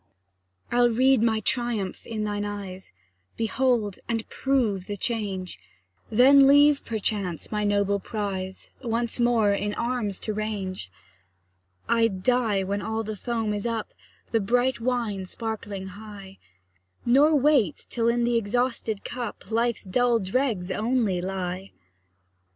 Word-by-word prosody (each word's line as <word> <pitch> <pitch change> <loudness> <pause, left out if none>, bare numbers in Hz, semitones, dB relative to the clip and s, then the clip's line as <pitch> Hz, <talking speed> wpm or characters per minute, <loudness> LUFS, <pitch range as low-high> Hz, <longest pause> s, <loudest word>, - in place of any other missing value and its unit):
I'll 240 0 +4
read 255 +1 +4
my 220 -1 +2
triumph 230 -5 -1
in 220 -2 -3
thine 205 -1 -2
eyes, 195 -2 -6 0.5
Behold, 230 -3 0
and 225 -1 -1
prove 230 -9 0
the 205 - -4
change; 195 - -3 0.5
Then 270 +4 +7
leave, 285 +1 +6
perchance, 205 -6 -3
my 210 -1 -1
noble 200 -1 +1
prize, 190 -3 -4
Once 235 -1 -1
more 235 -4 +3
in 205 +1 -2
arms 235 -5 -2
to 215 - -2
range. 200 - -4 1.0
I'd 225 -5 +1
die 230 -5 +2
when 200 +2 -2
all 220 +2 -2
the 215 0 -5
foam 225 0 -2
is 205 +2 -2
up, 225 -2 -3 0.4
The 225 - +3
bright 245 +4 +1
wine 230 -5 -1
sparkling 205 -2 -5
high; 200 -1 -11 0.7
Nor 285 +6 +5
wait 275 - +3
till 230 -1 0
in 235 0 +2
the 240 0 +2
exhausted 230 -1 -1
cup 240 -2 -6
Life's 235 0 0
dull 240 +5 +2
dregs 200 -2 -1
only 220 -5 0
lie. 185 0 -4
220 Hz, 130 wpm, -26 LUFS, 200-240 Hz, 1.0 s, Then